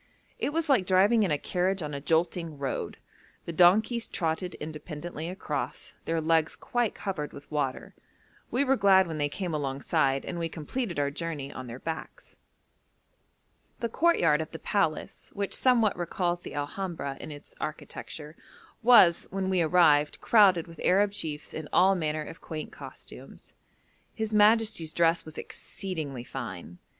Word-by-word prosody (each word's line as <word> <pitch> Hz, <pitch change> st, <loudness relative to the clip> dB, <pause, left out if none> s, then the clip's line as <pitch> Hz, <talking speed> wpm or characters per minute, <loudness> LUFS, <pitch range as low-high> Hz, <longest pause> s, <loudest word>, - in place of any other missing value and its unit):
It -, -, -1 dB
was 330 Hz, +1 st, -1 dB
like 245 Hz, -11 st, +3 dB
driving 200 Hz, +5 st, +4 dB
in 200 Hz, -, +2 dB
a 150 Hz, -, +2 dB
carriage 185 Hz, +3 st, -1 dB
on 150 Hz, -1 st, -5 dB
a 140 Hz, -, -4 dB
jolting 165 Hz, 0 st, 0 dB
road; 140 Hz, -1 st, -3 dB, 0.5 s
the 170 Hz, -, -5 dB
donkeys 210 Hz, +8 st, +4 dB
trotted 170 Hz, +1 st, -2 dB
independently 155 Hz, +1 st, -6 dB
across, 155 Hz, -6 st, -4 dB
their 165 Hz, 0 st, 0 dB
legs 160 Hz, 0 st, +2 dB
quite 240 Hz, -3 st, -1 dB
covered 170 Hz, -7 st, -4 dB
with 140 Hz, +2 st, -12 dB
water. 140 Hz, -3 st, -2 dB, 0.6 s
We 250 Hz, +4 st, +1 dB
were 270 Hz, -1 st, +3 dB
glad 195 Hz, -4 st, +5 dB
when 160 Hz, -3 st, -5 dB
they 145 Hz, 0 st, +1 dB
came 175 Hz, +3 st, -4 dB
alongside, 135 Hz, -1 st, 0 dB
and 170 Hz, -, -4 dB
we 165 Hz, -1 st, -2 dB
completed 175 Hz, -, -4 dB
our 140 Hz, -1 st, +1 dB
journey 145 Hz, -3 st, -5 dB
on 130 Hz, -1 st, -7 dB
their 120 Hz, +1 st, -7 dB
backs. 160 Hz, +4 st, -7 dB, 1.4 s
The 235 Hz, -, -2 dB
courtyard 175 Hz, -, +3 dB
of 155 Hz, -, -5 dB
the 160 Hz, -, -7 dB
palace, 165 Hz, -4 st, -1 dB
which 200 Hz, -1 st, -1 dB
somewhat 235 Hz, -6 st, +3 dB
recalls 175 Hz, 0 st, -1 dB
the -, -, -9 dB
Alhambra 145 Hz, -1 st, -4 dB
in -, -, -7 dB
its 145 Hz, 0 st, -11 dB
architecture, 155 Hz, 0 st, -6 dB, 0.5 s
was, 225 Hz, -8 st, +6 dB
when 190 Hz, 0 st, -2 dB
we 185 Hz, -2 st, +2 dB
arrived, 155 Hz, -3 st, +4 dB
crowded 195 Hz, -7 st, +5 dB
with 165 Hz, -2 st, -12 dB
Arab 200 Hz, +2 st, +4 dB
chiefs 155 Hz, -7 st, -5 dB
in 155 Hz, -1 st, -6 dB
all 190 Hz, +2 st, +5 dB
manner 155 Hz, -4 st, -1 dB
of 160 Hz, -, -10 dB
quaint 155 Hz, -1 st, -6 dB
costumes. -, -, -11 dB, 0.6 s
His 220 Hz, -2 st, -3 dB
majesty's 210 Hz, -6 st, +4 dB
dress 170 Hz, 0 st, +2 dB
was 155 Hz, -, -10 dB
exceedingly 155 Hz, -10 st, -5 dB
fine. 100 Hz, -10 st, -7 dB
165 Hz, 155 wpm, -28 LUFS, 150-195 Hz, 1.4 s, was